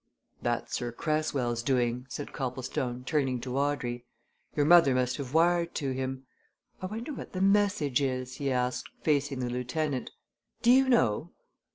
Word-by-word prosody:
"That's 120 -1 -2
Sir 120 -1 -2
Cresswell's 135 -4 -1
doing," 125 0 0
said 145 - -6
Copplestone, 125 -1 -3
turning 135 -3 0
to 125 0 -4
Audrey. 135 -4 -1 0.5
"Your 145 - +2
mother 160 -5 +7
must 125 0 +1
have 140 0 -6
wired 170 +1 +3
to 140 -3 -1
him. 130 0 -4 0.6
I 185 - -2
wonder 230 +9 -5
what - - -8
the 185 - -3
message 195 -9 +3
is?" 130 -2 -2
he 140 -2 -1
asked, 125 0 -1
facing 145 -3 +1
the 125 - -1
lieutenant. 125 +2 -2 0.5
"Do 240 - +6
you 265 +1 +5
know?" 170 - +2
135 Hz, 155 wpm, -29 LUFS, 125-155 Hz, 0.6 s, mother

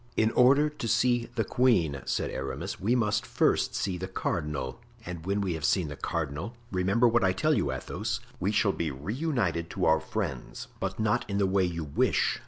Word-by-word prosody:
"In 110 0 +3
order 140 +5 +5
to 150 -6 -5
see 120 +1 +2
the 115 - +1
queen," 95 - +2
said - - -1
Aramis, 65 0 -4
"we 115 +6 +2
must 105 -3 +1
first - - +1
see 90 -3 -1
the 95 - -4
cardinal; 75 -8 -3 0.3
and 85 -1 -7
when 100 +1 +1
we 95 -3 -1
have 80 -2 -5
seen 80 0 +2
the 75 - -6
cardinal—remember 95 - -1
what 120 -1 +3
I 95 0 +3
tell 155 +12 +2
you, 70 - +1
Athos—we 65 +8 -3
shall 105 -1 +3
be 80 - -2
reunited 95 - -2
to - - -1
our 80 0 +5
friends, 80 - -4
but 95 +1 -3
not 110 -1 +2
in 100 - -1
the 100 - +3
way 95 0 +2
you 85 -2 -3
wish. 70 -2 +1
95 Hz, 190 wpm, -28 LUFS, 80-115 Hz, 0.3 s, order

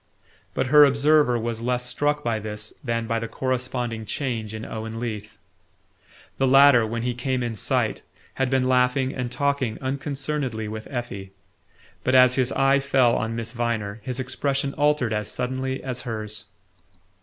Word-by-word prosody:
But - - +1
her 150 0 +10
observer 140 -2 +4
was 115 0 -3
less 125 +1 -1
struck 145 +3 0
by 115 -2 0
this 105 0 -6
than 115 -2 -1
by 115 0 -1
the 115 - -4
corresponding 125 -2 -2
change 115 -3 -3
in 110 0 -6
Owen 110 +1 -5
Leath. 110 -3 -5 1.0
The 135 - +3
latter, 135 -3 +7
when 115 +1 -3
he 125 0 0
came 130 +1 -1
in 120 -1 -2
sight, 105 - 0 0.3
had 135 -1 0
been 130 -1 +2
laughing 130 +1 +2
and 125 -2 -4
talking 140 -4 0
unconcernedly 135 -3 -3
with 110 +1 -6
Effie; 100 -7 -5 0.7
but 130 - +2
as 125 0 +7
his 130 -1 +1
eye 135 +1 +4
fell 135 -3 +3
on 115 -1 -2
Miss 115 0 -4
Viner 115 -3 -2
his 125 +4 -4
expression 135 +1 -1
altered 145 -6 +1
as 105 -1 -2
suddenly 130 +1 -3
as 130 -2 -4
hers. 110 -2 -4
125 Hz, 160 wpm, -24 LUFS, 115-135 Hz, 1.0 s, her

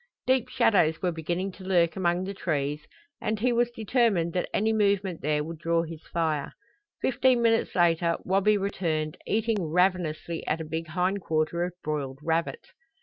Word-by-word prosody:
Deep 260 -2 +2
shadows 205 -10 +3
were 180 - +2
beginning 175 +4 -3
to 185 - -13
lurk 175 -3 +2
among 175 -1 +1
the 195 +1 -4
trees 150 -5 -2 0.3
and 215 0 -1
he 245 +2 +2
was 240 0 +2
determined 220 -7 +1
that 180 - -1
any 220 +2 +1
movement 200 -4 +1
there 150 +1 0
would 165 +1 -7
draw 165 0 +1
his 165 -1 -8
fire. 160 -4 -1 0.5
Fifteen 255 -1 +3
minutes 225 -1 +2
later 170 -1 +3
Wabi 195 +3 +3
returned, 165 -6 -2
eating 220 -1 +1
ravenously 170 -1 0
at 160 - 0
a 160 - -4
big 160 +1 -4
hind 180 +5 0
quarter 160 +1 0
of 175 0 -3
broiled 140 -3 -3
rabbit. 165 +1 -1
175 Hz, 165 wpm, -27 LUFS, 160-200 Hz, 0.5 s, shadows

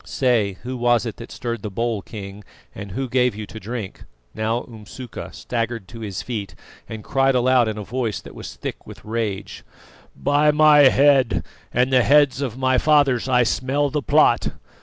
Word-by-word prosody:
Say, 120 -7 +1
who 130 +1 -5
was 120 -1 +2
it 115 - -5
that 115 - -10
stirred 120 -2 -4
the 105 - -5
bowl, 115 +1 -2
King, 100 -1 -9 0.3
and 100 -1 -8
who 135 +4 -3
gave 125 -2 +1
you 105 0 -6
to 110 - -10
drink?" 110 -2 -7 0.3
Now 110 +2 -1
Umsuka 115 +2 -9
staggered 115 -4 -4
to 115 - -10
his 105 -4 -5
feet, 100 -7 -5 0.3
and 110 -1 -7
cried 135 0 +2
aloud 125 -1 +3
in 110 -1 -3
a 105 - -5
voice 115 0 -3
that - - -12
was - - -9
thick - - -7
with - - -12
rage: 105 -3 -4 0.5
"By 145 +1 +2
my 150 -2 +6
head 135 -3 +3 0.3
and 125 +2 +1
the 130 - +6
heads 145 +1 +4
of 125 -4 -3
my 130 -1 +2
fathers 140 -5 +3
I 125 -1 +4
smell 135 +4 0
the 150 - -1
plot! - - +3
120 Hz, 180 wpm, -22 LUFS, 110-130 Hz, 0.5 s, my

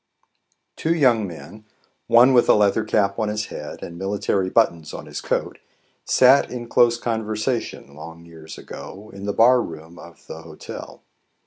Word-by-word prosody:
TWO 165 +1 0
young 120 -9 +3
men, 100 +5 -11 0.4
one 125 +3 +6
with 120 - +4
a - - +7
leather 105 +1 +2
cap 100 -1 0
on 110 -1 0
his 105 0 -2
head - - -8
and 85 0 -8
military 95 -1 -1
buttons 85 -8 0
on - - -8
his - - -7
coat, - - -3 0.5
sat 130 +2 +4
in 120 -1 -7
close 120 0 +3
conversation, 110 - -3
long 80 +2 -11
years 80 -1 -12
ago, 105 +3 -10
in 100 0 -9
the 100 - -1
bar 120 +4 +4
room 80 0 -9
of 85 -1 -15
the 80 - -9
Hotel. 80 -2 -10
105 Hz, 160 wpm, -22 LUFS, 85-120 Hz, 0.5 s, a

